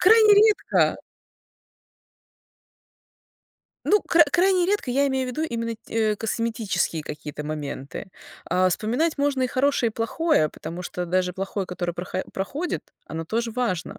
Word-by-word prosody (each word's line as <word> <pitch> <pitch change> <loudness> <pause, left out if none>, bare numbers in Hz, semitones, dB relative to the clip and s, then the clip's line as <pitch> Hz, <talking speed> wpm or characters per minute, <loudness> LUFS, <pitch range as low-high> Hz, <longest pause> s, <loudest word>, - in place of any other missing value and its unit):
Крайне 430 +1 +7
редко! 425 0 +3 2.9
Ну, 420 - +4
к 330 -2 +5
крайне 365 0 +3
редко 400 -9 0
я 280 +3 +2
имею 265 -1 0
в - - -3
виду 280 +5 -3
именно 230 -6 -2
те 220 -1 +1
э, - - -4
косметические 220 -7 -1
какие-то 150 0 -7
моменты. 150 +4 -5 0.4
А, 185 0 +3
вспоминать 245 - 0
можно 280 -2 +1
и 255 - +3
хорошее, 260 -1 +1
и - - -17
плохое, 230 - +1
потому 170 +5 -7
что 180 0 -4
даже 180 +1 +1
плохое, 195 +1 -3
которое 175 -1 -3
проха 180 +2 -4
проходит, 275 - -4
оно 160 0 -5
тоже 230 +6 -1
важно. 220 -8 -2
230 Hz, 140 wpm, -24 LUFS, 180-285 Hz, 2.9 s, Крайне